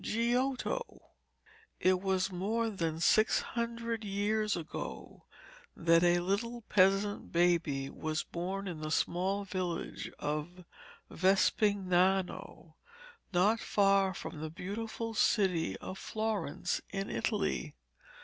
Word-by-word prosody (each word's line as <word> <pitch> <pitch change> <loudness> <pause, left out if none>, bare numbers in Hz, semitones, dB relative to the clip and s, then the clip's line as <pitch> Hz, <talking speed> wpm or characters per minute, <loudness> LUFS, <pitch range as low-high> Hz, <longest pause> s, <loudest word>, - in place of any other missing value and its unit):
GIOTTO 255 - -1 0.8
It 185 0 +3
was 190 0 0
more 220 +5 -1
than 165 -5 -2
six 215 +6 +4
hundred 230 -1 -3
years 210 +1 0
ago 165 -2 -7 0.5
that 165 0 +4
a 175 0 +4
little 230 +6 -1
peasant 200 0 +2
baby 170 -6 +2
was 155 +2 -3
born 190 +3 -4
in 170 -4 -5
the 155 0 -4
small 185 +5 0
village 185 -3 -4
of 155 +5 -4 0.5
Vespignano, 190 0 +1 0.6
not 200 +5 +3
far 195 -2 +3
from 150 - -7
the 155 - -4
beautiful 225 +6 -5
city 180 - +2
of 185 - -7
Florence, 215 -6 -2
in 195 +1 -3
Italy. - - -1
190 Hz, 105 wpm, -32 LUFS, 175-215 Hz, 0.8 s, six